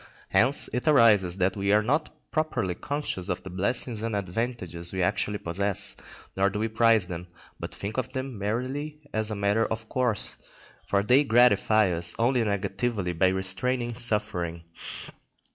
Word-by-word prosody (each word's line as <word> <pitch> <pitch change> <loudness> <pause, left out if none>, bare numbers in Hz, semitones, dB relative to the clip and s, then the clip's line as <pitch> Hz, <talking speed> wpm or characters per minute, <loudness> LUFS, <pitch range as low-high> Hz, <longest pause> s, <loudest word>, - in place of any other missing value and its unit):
Hence 130 +4 +4
it 125 +5 -2
arises 105 - +5
that 95 0 +1
we 100 0 0
are 105 +1 +4
not 145 +7 0 0.2
properly 155 - -1
conscious 140 -6 -3
of 90 - -2
the 95 - -8
blessings 110 +4 -1
and 115 -1 -2
advantages 95 -4 -3
we 95 -1 -1
actually 105 +3 0
possess, 100 +2 -1 0.4
nor 95 +1 +3
do 100 - -5
we 110 +2 0
prize 110 -2 +4
them, 90 0 -7 0.3
but - - -6
think 100 +4 -5
of 130 - -4
them 130 -1 -4
merely 130 +9 -3 0.2
as 110 0 0
a 105 - -3
matter 100 +2 +1
of 110 0 -5
course, 125 -5 -1 0.5
for 100 0 +2
they 125 +7 +5
gratify 110 -5 +4
us 85 +1 0
only 120 +1 +2
negatively 100 -1 -1
by 90 +3 +3
restraining 120 +7 0
suffering. 105 -8 -1
105 Hz, 160 wpm, -27 LUFS, 95-120 Hz, 0.5 s, arises